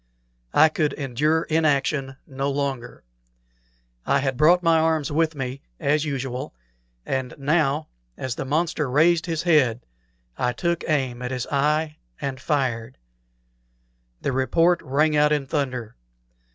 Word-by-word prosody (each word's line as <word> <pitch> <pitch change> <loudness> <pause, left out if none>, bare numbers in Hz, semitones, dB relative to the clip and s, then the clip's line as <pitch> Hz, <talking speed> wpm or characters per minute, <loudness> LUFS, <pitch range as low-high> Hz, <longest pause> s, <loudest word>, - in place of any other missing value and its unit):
I 155 +1 +7
could 155 -1 0
endure 150 +4 0
inaction 145 -3 0
no 135 +1 -3
longer. 135 -3 -3 1.0
I 140 - +2
had 135 -1 -1
brought 170 +6 +4
my 165 -1 +4
arms 160 -2 +1
with 160 +1 +1
me, 135 -1 -5 0.2
as 150 +2 +1
usual; 135 -1 -4 0.5
and 130 -2 -3
now, 150 +1 +1 0.3
as 130 -2 -3
the 130 - -4
monster 155 +1 -1
raised 165 +6 +3
his 165 -1 -2
head, 130 -9 +3 0.5
I 125 0 +1
took 170 +6 -1
aim 130 -5 0
at 125 - -3
his 125 -1 -3
eye 150 +2 +1 0.2
and 135 -2 -4
fired. 130 -5 -1 1.3
The - - 0
report 165 +7 +2
rang 150 +4 +1
out 150 0 +4
in 145 -2 +1
thunder. 130 -6 -3
145 Hz, 135 wpm, -24 LUFS, 130-155 Hz, 1.3 s, I